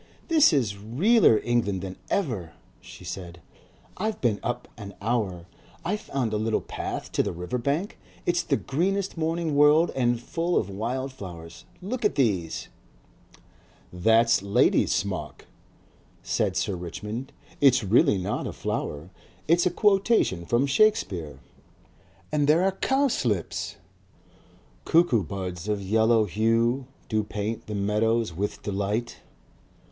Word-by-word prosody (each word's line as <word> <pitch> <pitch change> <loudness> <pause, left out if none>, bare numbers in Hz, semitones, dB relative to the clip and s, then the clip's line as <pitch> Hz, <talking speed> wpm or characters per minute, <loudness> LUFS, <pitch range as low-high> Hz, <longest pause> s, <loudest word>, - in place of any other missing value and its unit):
"This 315 - +6
is 125 - +1
realler 125 - +4
England 110 -6 0
than 95 -1 -6
ever," 110 - -2 0.3
she - - -13
said. 85 -2 -7 0.6
"I've 215 +3 -2
been 110 -5 +1
up 120 - -3
an 100 -4 -9
hour. 100 -6 -1 0.4
I 185 +5 +1
found 135 - -3
a - - +1
little 110 +1 0
path - - -5
down - - -14
to - - +2
the - - -2
river 90 +8 -4
bank. 145 - -2 0.3
It's 175 0 +2
the 140 - 0
greenest 190 +7 -1
morning 165 -1 -1
world 150 +3 +5
and 120 -2 +1
full 170 +8 -1
of 100 - -1
wild 125 +7 -3
flowers. 85 -8 -10 0.2
Look 240 +5 -4
at 210 - +2
these." 100 - 0 1.3
"That's 115 +6 +4
lady's 100 +1 +3
smock," 95 -8 -3 0.8
said - - 0
Sir 100 - -1
Richmond. 105 - -6 0.3
"It's 130 -4 +5
not 100 - -5
really 100 -5 +4
a 105 - -2
flower; 75 +5 -4 0.4
it's 170 +3 +4
a - - +3
quotation 195 - +2
from 120 +3 +2
Shakespeare." 120 - +1 0.9
"And 150 -1 +1
there 160 +4 +4
are 195 - +3
cowslips!" 105 - 0 1.1
"CUCKOO 165 -9 +3
BUDS 90 0 -5
OF 105 -1 0
YELLOW 110 +3 +3
HUE. 115 +6 +1 0.2
DO 110 -1 0
PAINT 110 +2 -4
THE 105 - -4
MEADOWS 105 +1 +1
WITH 100 +5 -4
DELIGHT. 105 +4 -2
115 Hz, 135 wpm, -26 LUFS, 100-150 Hz, 1.3 s, This